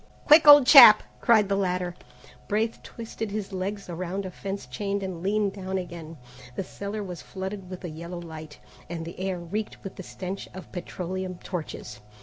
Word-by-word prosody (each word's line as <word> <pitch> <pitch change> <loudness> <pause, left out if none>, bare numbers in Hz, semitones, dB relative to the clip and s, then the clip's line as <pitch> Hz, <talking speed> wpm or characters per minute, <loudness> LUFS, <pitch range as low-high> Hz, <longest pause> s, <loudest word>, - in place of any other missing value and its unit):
"Quick, 305 +1 +7
old 290 -2 +10
chap!" 250 -6 +10 0.2
cried 220 -4 +4
the 200 - 0
latter. 180 -2 -1 0.5
Braith 220 +2 -1
twisted 225 -1 -7
his 205 -1 -5
legs 195 +2 -4
around 185 +3 -4
a 185 - -6
fence 195 +2 -6
chain 200 +10 -3
and 185 -3 -5
leaned 200 +1 0
down 190 -1 -4
again. 170 -3 -7 0.4
The - - -2
cellar 200 +3 -6
was 180 -4 -7
flooded 190 0 -7
with 185 0 -8
a - - -4
yellow 170 +3 -7
light, 160 -3 -10 0.3
and 165 -1 -5
the 170 - -9
air 190 -1 -2
reeked 195 +5 -5
with 195 - -8
the - - -6
stench 185 +1 -7
of 190 - -10
petroleum 185 +1 -5
torches. 155 - -6
190 Hz, 175 wpm, -26 LUFS, 175-205 Hz, 0.5 s, old